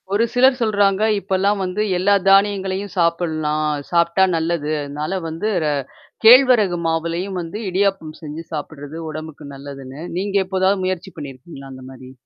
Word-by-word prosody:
ஒரு 210 Hz, +3 st, +3 dB
சிலர் 255 Hz, +1 st, +4 dB
சொல்றாங்க, 205 Hz, -3 st, +2 dB, 0.2 s
"இப்பல்லாம் 200 Hz, +1 st, 0 dB
வந்து 185 Hz, +3 st, -2 dB, 0.2 s
எல்லா 195 Hz, +3 st, +3 dB, 0.2 s
தானியங்களையும் 195 Hz, -1 st, +2 dB
சாப்பிட்லாம். 155 Hz, -3 st, 0 dB, 0.2 s
சாப்டா 170 Hz, +2 st, +3 dB
நல்லது. 165 Hz, -2 st, -1 dB
அதனால 150 Hz, +6 st, -4 dB
வந்து 165 Hz, +6 st, -4 dB, 0.2 s
ர -, -, +1 dB, 0.6 s
கேழ்வரகு 235 Hz, -6 st, +6 dB
மாவுலயும் 170 Hz, +4 st, -2 dB
வந்து 170 Hz, +4 st, -6 dB
இடியாப்பம் 190 Hz, -4 st, -1 dB
செஞ்சு 155 Hz, +1 st, -7 dB
சாப்பிட்டுறது 150 Hz, 0 st, -7 dB
உடம்புக்கு 155 Hz, -1 st, -8 dB
நல்லதுன்னு." 135 Hz, 0 st, -9 dB, 0.2 s
நீங்க 200 Hz, +2 st, -3 dB
எப்போதாவது 190 Hz, +1 st, +1 dB
முயற்சி 185 Hz, 0 st, -3 dB
பண்ணியிருக்கீங்களா? 135 Hz, 0 st, -10 dB
அந்தமாரி? 130 Hz, 0 st, -11 dB
170 Hz, 125 wpm, -20 LUFS, 155-195 Hz, 0.6 s, கேழ்வரகு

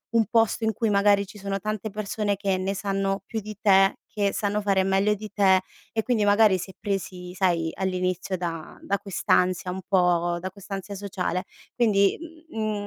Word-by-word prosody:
un 225 Hz, -, +5 dB
posto 225 Hz, -1 st, +2 dB
in 220 Hz, -, +2 dB
cui 225 Hz, +2 st, 0 dB
magari 200 Hz, 0 st, +4 dB
ci 210 Hz, +2 st, -13 dB
sono 195 Hz, 0 st, -3 dB
tante 215 Hz, +1 st, -3 dB
persone 210 Hz, 0 st, -2 dB
che 195 Hz, -2 st, 0 dB
ne 190 Hz, +1 st, -1 dB
sanno 195 Hz, 0 st, -1 dB
più 220 Hz, -2 st, -4 dB
di 210 Hz, 0 st, -8 dB
te, 195 Hz, -2 st, +4 dB
che 200 Hz, -2 st, 0 dB
sanno 205 Hz, 0 st, -1 dB
fare 195 Hz, -2 st, +2 dB
meglio 195 Hz, +2 st, +2 dB
di 215 Hz, +1 st, -8 dB
te 190 Hz, -2 st, +5 dB, 0.3 s
e 220 Hz, -, 0 dB
quindi 235 Hz, -4 st, +1 dB
magari 205 Hz, -1 st, +5 dB
se 190 Hz, +2 st, -8 dB
presi, 185 Hz, -3 st, -4 dB
sai, 175 Hz, -3 st, +1 dB
all'inizio 185 Hz, 0 st, -1 dB
da 165 Hz, -2 st, -5 dB
da 200 Hz, -, -1 dB
quest'ansia 185 Hz, -1 st, +1 dB
un 190 Hz, +1 st, -5 dB
po' 175 Hz, -2 st, +2 dB
da 185 Hz, +2 st, -4 dB
quest'ansia 200 Hz, 0 st, -7 dB
sociale. 185 Hz, -2 st, -3 dB, 0.3 s
Quindi, 200 Hz, -5 st, +3 dB, 0.3 s
mhmm, 215 Hz, -2 st, -2 dB
195 Hz, 175 wpm, -25 LUFS, 185-210 Hz, 0.3 s, un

